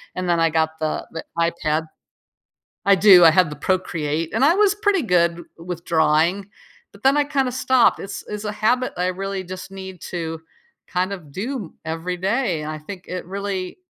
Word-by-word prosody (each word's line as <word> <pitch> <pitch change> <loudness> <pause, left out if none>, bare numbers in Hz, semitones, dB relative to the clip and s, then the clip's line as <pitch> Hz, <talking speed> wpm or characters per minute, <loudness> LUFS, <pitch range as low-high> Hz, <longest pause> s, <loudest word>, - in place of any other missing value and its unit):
and 185 0 -3
then 170 -1 +3
I 165 - +3
got 160 0 0
the 155 -1 -2
the 165 - -6
iPad 160 -2 0 1.0
I 200 - +7
do, 185 -3 +8
I 165 - +8
have 180 0 +4
the 150 - -7
Procreate, 165 -2 -1
and 235 +5 +3
I 325 - +5
was 410 -1 +3
pretty 410 -3 +2
good 180 - +3
w 170 - -11
with 170 0 -7
drawing, 165 +5 +2 0.4
but 200 - -18
then 275 +2 +4
I 290 - +4
kinda 275 -3 0
stopped. 255 -1 +3
It's 195 -1 -6
it's 210 0 -5
a 210 - -1
habit 230 +4 +1
I 180 +1 0
really 195 +1 -3
just 185 +1 -8
need 190 -2 -9
to 165 -2 -4 0.5
kind 185 +2 -1
of 160 -7 -10
do 215 - -5
every 165 +3 -3
day, 195 - 0
and 150 +1 -4
I 155 - -5
think 180 +4 -9
it 180 0 -5
really 195 - -4
185 Hz, 195 wpm, -22 LUFS, 165-205 Hz, 1.0 s, do